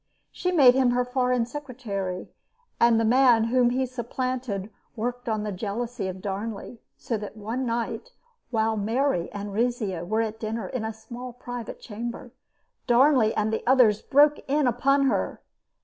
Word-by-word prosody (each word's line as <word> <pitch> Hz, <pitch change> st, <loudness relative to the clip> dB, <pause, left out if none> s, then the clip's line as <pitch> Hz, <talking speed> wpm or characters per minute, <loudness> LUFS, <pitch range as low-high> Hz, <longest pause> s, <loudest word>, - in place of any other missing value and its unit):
She 360 Hz, -, -2 dB
made 275 Hz, -8 st, +7 dB
him 260 Hz, -1 st, +3 dB
her 245 Hz, 0 st, +1 dB
foreign 250 Hz, -1 st, +1 dB
secretary, 230 Hz, -9 st, -5 dB, 0.5 s
and 235 Hz, -1 st, +5 dB
the 225 Hz, -, +2 dB
man 245 Hz, -1 st, +5 dB
whom 245 Hz, +1 st, +3 dB
he 260 Hz, +2 st, 0 dB
supplanted 245 Hz, -4 st, -3 dB, 0.2 s
worked 245 Hz, +1 st, -3 dB
on 215 Hz, -1 st, -1 dB
the 210 Hz, -, -3 dB
jealousy 215 Hz, +2 st, -3 dB
of 185 Hz, 0 st, -6 dB
Darnley; 210 Hz, +3 st, -5 dB, 0.2 s
so 230 Hz, -, -3 dB
that 210 Hz, +1 st, -8 dB
one 230 Hz, +5 st, -3 dB
night, 235 Hz, -, -3 dB, 0.4 s
while 220 Hz, -1 st, +1 dB
Mary 220 Hz, -3 st, 0 dB
and 205 Hz, 0 st, -6 dB
Rizzio 215 Hz, -6 st, -1 dB
were 215 Hz, +5 st, 0 dB
at 220 Hz, 0 st, -5 dB
dinner 225 Hz, +1 st, -3 dB
in 250 Hz, -4 st, -4 dB
a 220 Hz, -, -2 dB
small 240 Hz, +3 st, -9 dB
private 245 Hz, -2 st, -7 dB
chamber, 235 Hz, +2 st, -7 dB, 0.6 s
Darnley 245 Hz, -2 st, +5 dB
and 215 Hz, +1 st, 0 dB
the -, -, -1 dB
others 235 Hz, -6 st, +5 dB
broke 295 Hz, +2 st, +4 dB
in 290 Hz, +1 st, +2 dB
upon 270 Hz, +3 st, +2 dB
her. 270 Hz, -, 0 dB
235 Hz, 160 wpm, -26 LUFS, 215-255 Hz, 0.6 s, made